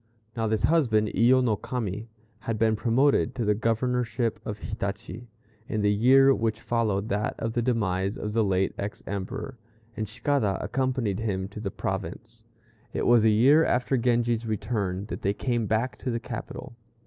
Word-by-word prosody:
Now 115 Hz, -1 st, -1 dB
this 110 Hz, -2 st, 0 dB
husband 115 Hz, -10 st, +3 dB
Iyo 130 Hz, +3 st, +4 dB
no 115 Hz, -4 st, +2 dB
Kami, 115 Hz, -2 st, -4 dB, 0.3 s
had 115 Hz, -1 st, -3 dB
been 110 Hz, 0 st, +2 dB
promoted 125 Hz, +6 st, +2 dB
to 120 Hz, -, -1 dB
the 105 Hz, -, +3 dB
governorship 115 Hz, 0 st, 0 dB
of 105 Hz, -2 st, -5 dB
Hitachi, 100 Hz, +4 st, -5 dB, 0.4 s
in 110 Hz, -, -1 dB
the 105 Hz, 0 st, +3 dB
year 135 Hz, +5 st, +6 dB
which 110 Hz, -3 st, -1 dB
followed 110 Hz, -4 st, 0 dB
that 105 Hz, +2 st, -1 dB
of 115 Hz, 0 st, -3 dB
the 120 Hz, -, 0 dB
demise 100 Hz, -5 st, 0 dB
of 105 Hz, 0 st, -4 dB
the 115 Hz, 0 st, +3 dB
late 95 Hz, -1 st, +1 dB
ex 100 Hz, +1 st, -5 dB
Emperor, 115 Hz, +6 st, -5 dB, 0.4 s
and 110 Hz, -2 st, -4 dB
Cicada 110 Hz, -4 st, 0 dB
accompanied 125 Hz, -6 st, -1 dB
him 95 Hz, -4 st, -2 dB
to 105 Hz, -, -9 dB
the 105 Hz, -2 st, -3 dB
province. 110 Hz, +4 st, -5 dB, 0.5 s
It -, -, -1 dB
was 120 Hz, -2 st, +5 dB
a 110 Hz, -, +5 dB
year 135 Hz, +9 st, +5 dB
after 125 Hz, 0 st, +1 dB
Genji's 120 Hz, -1 st, +1 dB
return 100 Hz, -3 st, -2 dB
that -, -, -5 dB
they 100 Hz, +1 st, 0 dB
came 120 Hz, -3 st, -1 dB
back 115 Hz, +4 st, -1 dB
to 130 Hz, -, -3 dB
the 115 Hz, -1 st, -1 dB
capital. 115 Hz, -, -7 dB
115 Hz, 170 wpm, -26 LUFS, 105-120 Hz, 0.5 s, year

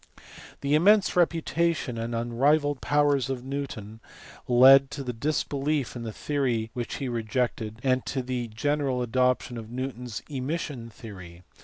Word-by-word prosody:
The 140 Hz, +1 st, 0 dB
immense 195 Hz, +6 st, +5 dB
reputation 165 Hz, -6 st, +1 dB
and 115 Hz, +1 st, -3 dB
unrivalled 140 Hz, +5 st, +1 dB
powers 145 Hz, -3 st, +2 dB
of 130 Hz, -2 st, -4 dB
Newton 130 Hz, -6 st, -5 dB, 0.5 s
led 135 Hz, +2 st, +7 dB
to 145 Hz, -1 st, -6 dB
disbelief 140 Hz, +2 st, -1 dB
in 115 Hz, -1 st, -5 dB
a -, -, -4 dB
theory 120 Hz, -4 st, -1 dB
which 120 Hz, -1 st, -4 dB
he 135 Hz, -, -3 dB
rejected, 115 Hz, -2 st, -2 dB
and 130 Hz, -1 st, +2 dB
to 130 Hz, -2 st, -2 dB
the 125 Hz, -1 st, -3 dB
general 130 Hz, +2 st, -1 dB
adoption 125 Hz, 0 st, +1 dB
of 110 Hz, -1 st, -9 dB
Newton 125 Hz, 0 st, -5 dB
s 115 Hz, -3 st, -6 dB
emission 135 Hz, -3 st, -4 dB
theory 105 Hz, -6 st, -10 dB
(see 85 Hz, -, -12 dB
below, 85 Hz, +1 st, -17 dB
p. -, -, -33 dB
130 Hz, 155 wpm, -27 LUFS, 115-145 Hz, 0.5 s, led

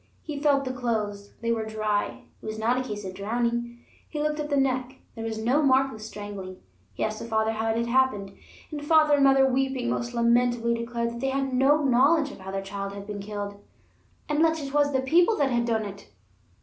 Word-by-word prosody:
He 300 Hz, -3 st, -5 dB
felt 280 Hz, -2 st, +2 dB
the 255 Hz, -, -3 dB
clothes; 210 Hz, -5 st, -3 dB
they 230 Hz, 0 st, 0 dB
were 225 Hz, -1 st, 0 dB
dry; 215 Hz, -1 st, -2 dB, 0.2 s
it -, -, -30 dB
was 215 Hz, 0 st, -4 dB
not 225 Hz, +3 st, +1 dB
a -, -, 0 dB
case 210 Hz, -5 st, -5 dB
of 185 Hz, -, -5 dB
drowning. 235 Hz, +4 st, -2 dB, 0.3 s
He 300 Hz, -, -5 dB
looked 300 Hz, 0 st, -1 dB
at 295 Hz, 0 st, -3 dB
the 285 Hz, -, +1 dB
neck; 260 Hz, -1 st, 0 dB, 0.2 s
there 225 Hz, -, -7 dB
was 225 Hz, -1 st, -3 dB
no 245 Hz, +7 st, +2 dB
mark 270 Hz, -1 st, +3 dB
of 220 Hz, -, -10 dB
strangling. 205 Hz, -3 st, -7 dB, 0.4 s
He -, -, -2 dB
asked 215 Hz, 0 st, -2 dB
the -, -, -6 dB
father 220 Hz, -1 st, +1 dB
how 225 Hz, 0 st, -1 dB
it 225 Hz, -, +1 dB
had 235 Hz, -, 0 dB
happened, 235 Hz, -6 st, +1 dB, 0.4 s
and 295 Hz, -1 st, -5 dB
father 310 Hz, 0 st, +5 dB
and 285 Hz, -1 st, +4 dB
mother, 270 Hz, 0 st, +6 dB
weeping 265 Hz, -2 st, 0 dB
most 240 Hz, 0 st, -3 dB
lamentably, 235 Hz, 0 st, +2 dB
declared 235 Hz, 0 st, -3 dB
they 270 Hz, -, 0 dB
had 270 Hz, 0 st, -1 dB
no 280 Hz, +4 st, +4 dB
knowledge 285 Hz, +4 st, +4 dB
of -, -, -12 dB
how 190 Hz, 0 st, -8 dB
their 195 Hz, 0 st, -3 dB
child 200 Hz, 0 st, -5 dB
had 200 Hz, 0 st, -8 dB
been 205 Hz, 0 st, -6 dB
killed: 205 Hz, 0 st, -6 dB, 0.6 s
"unless 320 Hz, +2 st, +2 dB
it 275 Hz, 0 st, -6 dB
was 290 Hz, -1 st, +3 dB
the 265 Hz, -1 st, +1 dB
People 345 Hz, +11 st, +3 dB
that 275 Hz, -2 st, +2 dB
had 235 Hz, -1 st, +1 dB
done 225 Hz, -2 st, 0 dB
it." 200 Hz, -, -9 dB
235 Hz, 220 wpm, -26 LUFS, 215-270 Hz, 0.6 s, mother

